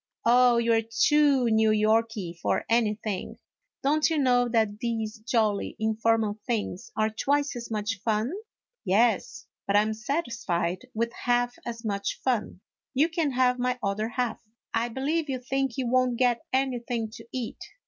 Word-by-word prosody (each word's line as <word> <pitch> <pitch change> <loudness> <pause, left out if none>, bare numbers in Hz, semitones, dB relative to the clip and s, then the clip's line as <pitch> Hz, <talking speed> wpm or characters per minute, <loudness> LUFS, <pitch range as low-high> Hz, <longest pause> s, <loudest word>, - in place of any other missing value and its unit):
" - - -38
Oh, 245 0 +5
you 235 0 +2
're 225 - +3
too 275 +4 +3
New 220 0 +4
Yorky 215 -3 +1
for 170 - -1
anything; 215 -3 -1 0.5
don't 300 +3 +3
you 320 - 0
know 245 -3 +3
that 220 -3 +1
these 225 -2 -3
jolly 215 -3 0
informal 220 -1 +1
things 210 -6 -3
are 215 0 +2
twice 285 +6 0
as 235 -1 -6
much 210 -1 -2
fun? 220 +5 0 0.2
" - - -67
" - - -63
Yes; 225 +2 +1 0.2
but 200 - +1
I 205 - +7
'm 220 0 -1
satisfied 230 - -2
with 230 +1 -1
half 245 0 0
as 230 0 -6
much 200 -1 -2
fun; 230 -7 -1 0.3
you 300 +5 +3
can 330 -3 0
have 250 0 +2
my 250 0 0
other 205 +2 -1
half." 240 -1 -2 0.2
" - - -67
I 230 +1 +1
believe 290 +6 -1
you 265 - -1
think 270 0 -2
you 260 -2 -1
won't 255 0 +2
get 245 -2 +1
anything 245 -4 -1
to 225 - -13
eat." 250 -3 -5
230 Hz, 170 wpm, -27 LUFS, 220-255 Hz, 0.5 s, I